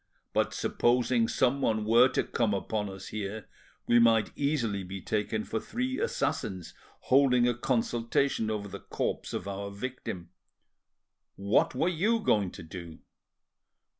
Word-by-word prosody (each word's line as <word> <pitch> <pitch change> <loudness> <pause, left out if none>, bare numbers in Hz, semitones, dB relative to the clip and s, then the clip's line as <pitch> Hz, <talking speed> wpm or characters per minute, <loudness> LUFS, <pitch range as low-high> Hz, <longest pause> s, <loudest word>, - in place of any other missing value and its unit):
But - - +1
supposing 120 -1 +2
someone 120 -5 +1
were 120 +3 +6
to - - 0
come 110 -4 0
upon 105 +1 -2
us 95 -1 -8
here, 105 0 -5 0.4
we 120 - +5
might 115 -2 +4
easily 125 -9 0
be 95 +2 -6
taken 110 +2 -1
for 110 - -3
three 255 - -3
assassins 100 - -2 0.3
holding 125 -2 +4
a 120 - +2
consultation 120 0 0
over 105 -2 -3
the 100 0 -8
corpse - - -3
of 95 - -4
our 100 0 -4
victim. 100 -5 -6 1.0
What 100 +5 +2
were 140 - +1
you 200 +7 +2
going 105 - +2
to - - -9
do?" 85 -1 -9
115 Hz, 135 wpm, -29 LUFS, 100-130 Hz, 1.0 s, were